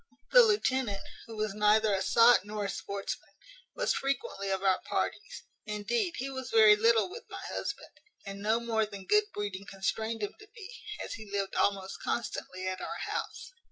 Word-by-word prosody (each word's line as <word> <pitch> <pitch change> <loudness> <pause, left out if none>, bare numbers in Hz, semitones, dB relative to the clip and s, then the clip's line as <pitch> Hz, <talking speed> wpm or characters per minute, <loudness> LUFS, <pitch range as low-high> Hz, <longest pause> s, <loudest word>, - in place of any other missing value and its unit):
"The - - +9
lieutenant, 260 - +1 0.2
who 225 -1 -9
was 215 -1 -1
neither 210 +1 +4
a 195 - +1
sot 230 +5 +6
nor 210 0 -4
a - - -2
sportsman, 200 +2 -5 0.4
was - - +1
frequently 245 -7 -2
of 190 0 -1
our 190 -1 +3
parties; - - -3 0.2
indeed 340 - -1
he 265 - -3
was 260 -1 -5
very 220 -3 +7
little 225 +1 +4
with 430 +6 -9
my - - -7
husband, - - -5 0.3
and 200 0 -7
no 220 +2 +2
more 225 -2 0
than 200 -2 -9
good 420 - +4
breeding 200 -1 -5
constrained 220 +3 -2
him 205 - -3
to 425 - -14
be, 450 +1 -10 0.3
as - - -5
he 215 -3 -9
lived 200 -1 -2
almost 195 -1 0
constantly 185 -5 -3
at 185 0 -3
our - - -4
house. - - -4
215 Hz, 180 wpm, -30 LUFS, 200-245 Hz, 0.4 s, The